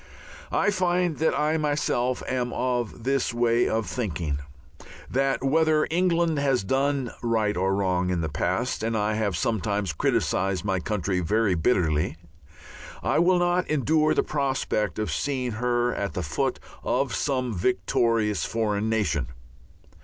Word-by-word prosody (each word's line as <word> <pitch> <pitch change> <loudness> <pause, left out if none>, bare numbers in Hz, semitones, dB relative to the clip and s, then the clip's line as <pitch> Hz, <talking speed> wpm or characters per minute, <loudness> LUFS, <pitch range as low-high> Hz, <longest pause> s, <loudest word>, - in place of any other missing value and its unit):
I 210 - +2
find 180 -3 +1
that 160 - +1
I 155 +2 +2
myself 145 -5 0
am 125 -1 -1
of 120 -2 -2
this 135 -2 0
way 120 0 +2
of 110 0 0
thinking, 85 - -3 0.7
that 135 +1 0
whether 155 +2 +3
England 170 -3 +2
has 135 -5 +1
done 135 +3 0
right 110 -3 +1
or 95 +2 +1
wrong 90 -2 0
in 90 -2 0
the 80 - -1
past 90 - -1
and 115 0 -1
I 105 0 0
have 105 -4 -1
sometimes 100 -4 -1
criticized 95 +5 0
my 95 -2 0
country 95 -1 -1
very 105 +3 +1
bitterly 80 -4 +1 0.9
I - - +2
will 180 +2 +4
not 175 +1 +1
endure 155 +2 +2
the - - +3
prospect 135 -7 -1
of 110 0 -2
seeing 130 -3 -1
her 120 +1 0
at 100 - -3
the 90 - -3
foot 75 - -1 0.2
of - - 0
some 130 -4 -1
victorious 105 +1 +1
foreign 110 -1 -1
nation. 105 -11 0
115 Hz, 145 wpm, -25 LUFS, 100-140 Hz, 0.9 s, will